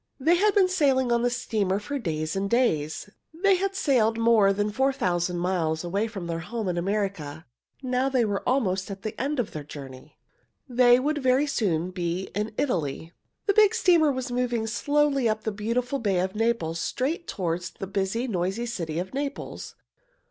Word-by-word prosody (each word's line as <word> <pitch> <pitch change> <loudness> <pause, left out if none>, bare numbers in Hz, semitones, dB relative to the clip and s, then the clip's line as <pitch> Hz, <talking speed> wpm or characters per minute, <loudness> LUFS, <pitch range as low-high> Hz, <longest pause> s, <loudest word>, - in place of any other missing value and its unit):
They 315 +6 +4
had 415 +4 +2
been 390 -2 +5
sailing 275 -9 +2
on 235 0 +3
the 245 - +2
steamer 215 -6 -1
for 280 +8 -4
days 155 -5 -2
and 195 +1 -1
days. 160 -11 +1 0.3
They 385 +2 +3
had 390 +1 -2
sailed 235 -10 +2
more 225 -3 +4
than 205 +1 0
four 265 +5 +2
thousand 175 -8 -1
miles 170 -3 0
away 200 +5 -1
from 200 -6 -6
their 165 -1 -3
home 220 +5 -4
in 180 - -1
America. 175 -5 -2 0.4
Now 255 +1 +1
they 255 -3 +2
were 205 -2 -1
almost 195 -8 0
at 195 0 -7
the 215 0 -3
end 285 +1 -1
of 235 - -1
their 150 - -6
journey. 140 -1 -11 0.5
They 245 -1 +5
would 295 +3 0
very 260 +1 +3
soon 185 - 0
be 180 +1 -3
in 210 +2 -2
Italy. 165 - -2 0.3
The 400 - +3
big 430 +1 +5
steamer 340 -8 +4
was 260 -1 -4
moving 245 -2 0
slowly 275 +2 +1
up 215 0 -2
the 220 - -1
beautiful 240 +6 -2
Bay 200 -6 +1
of 185 +1 -1
Naples, 215 -8 0
straight 300 - -2
toward 175 -3 -2 0.2
the - - -4
busy, 195 +5 -1
noisy 195 +2 -1
city 170 -10 -4
of 180 +6 -4
Naples. 280 +1 -5
220 Hz, 185 wpm, -26 LUFS, 180-260 Hz, 0.5 s, been